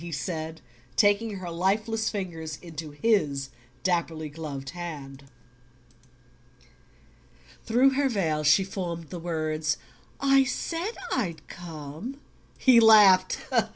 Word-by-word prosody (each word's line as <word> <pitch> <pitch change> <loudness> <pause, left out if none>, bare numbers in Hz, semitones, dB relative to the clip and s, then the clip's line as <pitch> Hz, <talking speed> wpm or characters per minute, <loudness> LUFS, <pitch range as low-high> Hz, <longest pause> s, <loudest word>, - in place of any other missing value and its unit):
he 170 0 -7
said, 160 +1 -4 0.3
taking 205 +1 +3
her 180 -3 -6
lifeless 215 +6 0
fingers 165 -7 -5
into 160 -2 -7
his 145 -5 0 0.3
dapperly 165 -3 -1
gloved 145 -4 -6
hand. 145 -6 -8 2.4
Through 250 +4 +4
her 275 0 +1
veil 160 -9 0
she 150 +6 +5
formed 170 -5 -5
the 175 - -5
words: 155 -2 -1 0.4
"I 275 -1 +5
said 335 - -3
I'd 180 -11 -2
come." 165 - -8 0.4
He 255 -3 +6
laughed. 205 -5 +6
175 Hz, 105 wpm, -27 LUFS, 155-215 Hz, 2.4 s, He